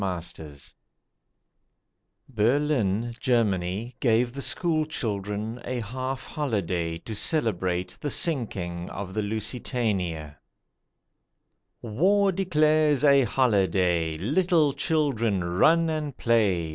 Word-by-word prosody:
A - - -2 0.2
HOLIDAY 75 -3 -9 1.7
Berlin, 120 -2 +1
Germany, 110 -2 0
gave 120 0 +2
the 140 - -5
school 160 +1 +1
children 105 -3 -4
a 125 0 -3
half 130 +4 -4
holiday 90 - -2
to 110 +6 -8
celebrate 95 - 0
the 145 - -3
sinking 95 - -2
of 95 -1 -6
the 110 - -1
Lusitania. 105 - -2 1.5
WAR 190 - +2
declares 155 -5 +2
a 140 -2 +5
holiday; 95 -9 +1
Little 155 - +2
children, 115 - 0
run 160 - +3
and 155 -4 -3
play. 100 -8 +1
115 Hz, 95 wpm, -26 LUFS, 95-145 Hz, 1.7 s, a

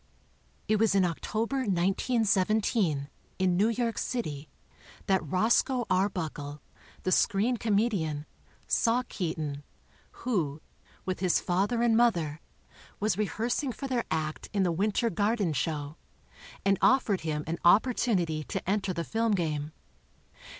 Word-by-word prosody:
It 215 0 +3
was 220 -2 +3
in 190 -2 +4
October, 220 +9 -2
1917, 200 - +1 0.3
in 185 -1 +2
New 205 +5 +3
York 230 0 -1
City, 155 - -3 0.6
that 190 -2 +2
Roscoe 225 - +2
Arbuckle, 160 -6 -1 0.4
the 185 - 0
screen 205 +7 +2
comedian, 200 -10 0 0.4
saw 235 +2 +2
Keaton, 155 -5 -3 0.6
who, 160 - 0 0.5
with 185 0 -2
his 185 -2 +2
father 200 +7 0
and 235 -2 +4
mother, 170 -11 +2 0.6
was 210 -2 +1
rehearsing 230 +6 -1
for 275 +3 -6
their 250 -3 -1
act 155 -1 -3
in 200 -2 +2
the 180 - +2
W 190 +5 +1
inter 230 +2 0
Garden 205 -5 +1
show, 150 +1 -3 0.7
and 195 -1 +3
offered 245 -7 +3
him 150 -2 -2
an 165 +1 -3
oppor 215 +8 +5
tunity 175 -11 0
to - - -4
enter 195 -1 0
the 170 - -2
film 225 +3 0
game. 155 -5 -1
195 Hz, 130 wpm, -29 LUFS, 160-225 Hz, 0.7 s, oppor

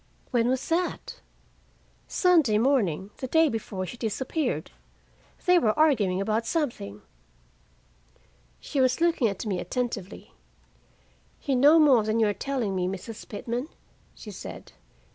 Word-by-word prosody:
"When 235 -2 +2
was 260 +1 -1
that?" 350 +2 -2 0.9
"Sunday 320 - +3
morning, 210 - +1
the 260 - -5
day 320 +3 +4
before 205 -5 -4
she 240 - -8
disappeared. 260 +7 -2 0.7
They 360 0 +5
were 215 -8 +1
arguing 205 -12 +2 0.2
something." 230 - -3 1.6
She 275 - -2
was 255 +2 +2
looking 335 -7 +2
at 200 +1 -4
me 195 -4 -1
attentively. 225 -2 -4 1.1
"You 275 -3 0
know 290 +6 +6
more 285 -7 +6
than 215 +1 0
you 225 - +4
are 205 - +1
telling 245 -6 -2
me, 180 -1 0
Mrs. 195 +4 -7
Pitman," 235 +5 -4 0.5
she - - -10
said. - - -9
240 Hz, 125 wpm, -26 LUFS, 205-285 Hz, 1.6 s, know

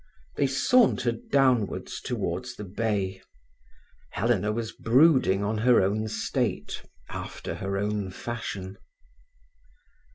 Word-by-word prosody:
They 140 - +2
sauntered 130 - +2
downwards 130 -6 +1
towards - - -3
the - - -7
bay. 100 -1 -2 0.9
Helena 105 -1 +1
was 115 0 -3
brooding 125 - +4
on 105 +1 -1
her 125 +2 +5
own 105 +3 +1
state, 110 0 -2 0.3
after - - -6
her 100 +1 -3
own 105 -1 -1
fashion. 100 -2 -6
110 Hz, 100 wpm, -27 LUFS, 100-120 Hz, 0.9 s, her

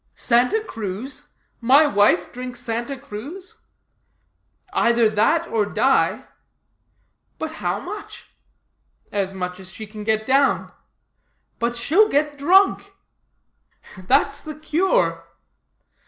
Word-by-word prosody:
'Santa 250 - +2
Cruz? 225 - -6 0.3
my 265 +6 +5
wife 205 -8 +3
drink 250 0 -7
Santa 240 +3 -4
Cruz?' 280 - -9 1.2
'Either 235 - +3
that 320 +11 +2
or 225 -7 +1
die.' 205 - +1 1.1
'But 315 - -4
how 180 +2 -1
much?' 410 - -9 0.8
'As 195 -2 -1
much 180 -1 -5
as 185 -1 -9
she 220 - -8
can 210 0 -9
get 220 0 0
down.' 275 +2 +2 0.9
'But 235 +1 -1
she'll 360 - +3
get 290 0 0
drunk!' 390 +5 +3 1.0
'That's 205 +9 +1
the 310 -1 -8
cure.' 355 - 0
245 Hz, 105 wpm, -22 LUFS, 210-310 Hz, 1.2 s, my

